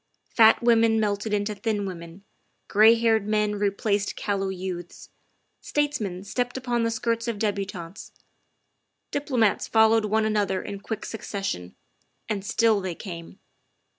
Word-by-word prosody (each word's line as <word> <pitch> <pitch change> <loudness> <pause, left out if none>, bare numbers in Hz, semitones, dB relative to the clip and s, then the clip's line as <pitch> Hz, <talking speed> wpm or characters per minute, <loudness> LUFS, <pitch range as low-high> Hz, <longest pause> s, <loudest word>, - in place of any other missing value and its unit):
Fat 225 0 +6
women 230 -1 +4
melted 205 0 -1
into 210 0 0
thin 210 -1 -2
women; 170 0 -8 0.4
gray 220 +3 +6
haired 225 -3 +2
men 210 -1 +1
replaced 205 0 -1
cal 200 -1 -2
low 195 0 -1
youths; 180 -2 -6 0.5
statesmen 230 -12 -2
stepped 245 +5 -2
upon 245 -2 -1
the 230 - +1
skirts 230 +1 -1
of 230 -3 -2
debu 200 -2 -1
tantes; 180 -1 -9 1.0
diplomats 255 -7 +1
followed 220 0 +4
one 215 +1 +1
another 205 -3 0
in 200 -1 -6
quick 220 +1 -5
succes 200 -3 -5
sion, 90 - -4 0.5
and 205 -3 -2
still 220 0 +2
they 185 -3 -4
came. 170 -2 -9
210 Hz, 140 wpm, -25 LUFS, 195-225 Hz, 1.0 s, Fat